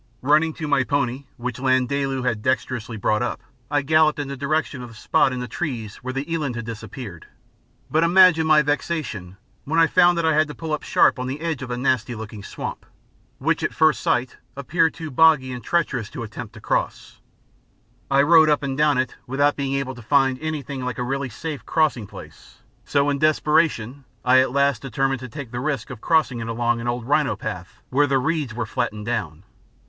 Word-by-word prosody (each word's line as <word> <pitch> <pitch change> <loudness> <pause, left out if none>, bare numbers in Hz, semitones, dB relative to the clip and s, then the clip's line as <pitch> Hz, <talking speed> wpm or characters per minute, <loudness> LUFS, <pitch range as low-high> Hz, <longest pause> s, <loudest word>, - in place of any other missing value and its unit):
Running 155 +4 +3
to 155 -1 -5
my 140 -2 +3
pony, 140 -1 -1
which 125 0 -5
Landaalu 130 0 0
had 115 -4 0
dexterously 120 -2 -2
brought 105 +2 +1
up, 120 - -2 0.3
I 145 -1 +1
galloped 155 +1 +3
in 145 -2 -4
the 140 - -4
direction 140 -1 -1
of 125 - -8
the 115 - -14
spot 130 - +2
in 125 -1 -4
the 125 - -4
trees 120 - -4
where 130 - -6
the 135 +2 -3
eland 145 -7 -2
had 120 -1 -5
disappeared; 110 - -8 0.6
but 160 +2 +2
imagine 170 -2 +5
my 155 -1 +5
vexation 145 - -3 0.3
when 160 +3 -2
I 165 - +7
found 175 +1 +4
that 170 - 0
I 160 - +3
had 155 0 +3
to 150 - -8
pull 160 -2 -4
up 150 - -1
sharp - - +3
on 125 - -3
the 135 +3 -4
edge 160 -4 -3
of 130 - -6
a 120 - -3
nasty 125 -2 0
looking 110 -1 -8
swamp, - - -6 0.5
which - - 0
at - - -2
first 155 -3 +3
sight 125 0 0 0.2
appeared 160 +4 +1
too 160 -2 -7
boggy 145 -2 +4
and 125 -2 -7
treacherous 130 -10 -1
to 120 - -6
attempt 110 -1 -8
to - - -10
cross. - - -3 0.9
I 140 +1 +4
rode 160 0 +6
up 150 -1 +2
and 135 -1 -2
down 150 -1 +3
it 130 -1 -1
without 140 +3 +2
being 140 -1 -2
able 135 -1 -2
to 120 - -11
find 130 +1 +2
anything 145 -4 -4
like 125 0 -3
a 125 - -2
really 135 +1 -2
safe 150 +5 -6
crossing 150 -9 +1
place, - - -14 0.2
so 140 0 +2
in 140 - -2
desperation 150 -4 +1 0.2
I 130 +1 +6
at 130 -1 +2
last 140 -3 +2
determined 135 +1 -1
to 130 0 -8
take 140 -3 -8
the 120 - -4
risk 140 0 -3
of 120 -4 -9
crossing 155 -7 +2
it 115 - -5
along 120 0 0
an 120 - -5
old 120 -1 -2
rhino 145 -3 +2
path 90 -1 -7
where 145 +3 +3
the 135 -1 +2
reeds 140 -3 -1
were 120 -1 -2
flattened 110 -2 -3
down. 95 -8 -3
135 Hz, 210 wpm, -22 LUFS, 120-150 Hz, 0.9 s, I